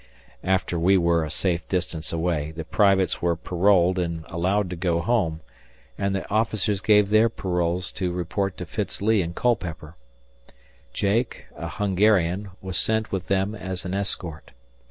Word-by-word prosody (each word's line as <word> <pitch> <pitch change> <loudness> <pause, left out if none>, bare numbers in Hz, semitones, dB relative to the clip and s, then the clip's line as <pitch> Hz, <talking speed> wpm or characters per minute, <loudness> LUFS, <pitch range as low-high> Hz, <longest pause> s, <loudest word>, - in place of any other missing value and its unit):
After 95 -2 0
we 95 +3 +4
were 85 -2 +2
a 75 - -4
safe 85 0 -1
distance 85 -4 -2
away, 80 -3 -1
the 80 +1 -6
privates 95 -1 +2
were 85 -1 +2
paroled 90 +1 +2
and 85 -2 -3
allowed 95 +4 0
to - - -3
go 85 -1 0
home, 85 -5 0 0.5
and 100 -1 -1
the 95 - -3
officers 110 -2 0
gave 105 -1 +4
their 110 +2 +5
paroles 90 -3 -1
to 90 -2 -2
report 90 +2 -2
to 90 - -5
Fitz 100 +4 -4
Lee 105 0 +3
in 85 0 -4
Culpeper. 85 -10 -1 1.0
Jake, 105 - -1
a - - -5
Hungarian, 100 -1 +2
was 95 -2 -2
sent 110 0 +1
with 95 -2 -3
them 95 +2 +1
as 95 -3 -5
an 90 - -3
escort. 95 -5 -3
95 Hz, 155 wpm, -24 LUFS, 85-100 Hz, 1.0 s, their